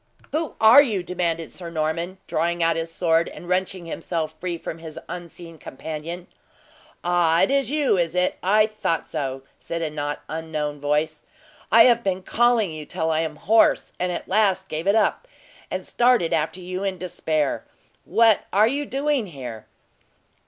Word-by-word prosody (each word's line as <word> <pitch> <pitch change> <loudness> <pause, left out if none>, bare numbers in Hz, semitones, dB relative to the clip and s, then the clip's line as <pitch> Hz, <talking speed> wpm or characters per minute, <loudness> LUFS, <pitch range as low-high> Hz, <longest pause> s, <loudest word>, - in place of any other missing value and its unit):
"Who 315 +1 -2
are 225 +6 +9
you?" 215 -10 -1
demanded 170 -2 -2
Sir 175 -2 -8
Norman, 165 +3 -2
drawing 170 +1 0
out 165 0 +3
his 165 0 -3
sword, 165 -1 +1
and 175 - -11
wrenching 185 0 -1
himself 165 -1 -3
free 175 -1 -3
from 165 0 -7
his 160 -1 -9
unseen 170 -2 -9
companion. 160 +6 -7 0.8
"Ah! 175 -1 +3
it - - +2
is 275 -2 +2
you, 285 -9 +2
is 170 0 -1
it? 180 0 +1
I 210 +3 +4
thought 215 -6 -2
so," 135 -4 -4 0.2
said 170 0 -4
a 155 - -2
not 145 -1 -4
unknown 155 -2 -4
voice. 150 +2 -1 0.4
"I 225 0 +8
have 235 -1 +4
been 190 -1 -1
calling 235 -5 +2
you 155 -1 -6
till 160 +2 -2
I 155 - +1
am 160 -1 -2
hoarse, 220 +9 +3
and 180 0 0
at - - -5
last 190 -1 +2
gave 160 +3 -4
it 200 - +4
up, 225 - +1 0.4
and - - -4
started 240 -8 +2
after 160 +4 -1
you 185 +2 -5
in 195 -2 -2
despair. 160 -5 -1 0.4
What 220 +2 +3
are 210 +3 +5
you 285 +4 -2
doing 275 -4 0
here?" 125 - -8
175 Hz, 170 wpm, -23 LUFS, 160-200 Hz, 0.8 s, are